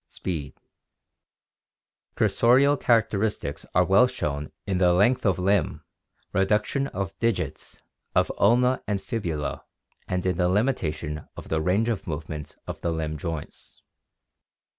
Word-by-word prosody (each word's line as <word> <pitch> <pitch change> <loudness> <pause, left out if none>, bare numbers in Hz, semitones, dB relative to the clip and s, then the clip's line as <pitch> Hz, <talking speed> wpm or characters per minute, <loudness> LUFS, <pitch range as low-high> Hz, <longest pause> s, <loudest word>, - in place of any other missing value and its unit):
Speed. 75 -7 -5 0.8
— - - -52
Cursorial 135 +5 +4
characteristics 110 - 0
are 90 0 +5
well 100 +7 +5
shown 75 - -3
in 95 -3 -1
the 90 -1 +5
length 115 +6 +3
of 95 -3 +2
limb, 90 -4 +1 0.5
reduction 105 +8 +1
of 95 -6 -4
digits, 115 -3 -2 0.3
of - - +3
ulna 125 +5 +4
and 100 -2 0
fibula, 85 - -3 0.4
and 90 0 -2
in 90 -2 +1
the 90 0 +2
limitation 80 - -1
of - - -9
the 80 -1 0
range 95 +7 +2
of 115 -4 -2
movement 80 -2 -5
of - - -7
the 85 - 0
limb 80 -1 -2
joints. 80 0 -7
95 Hz, 130 wpm, -26 LUFS, 80-115 Hz, 0.8 s, are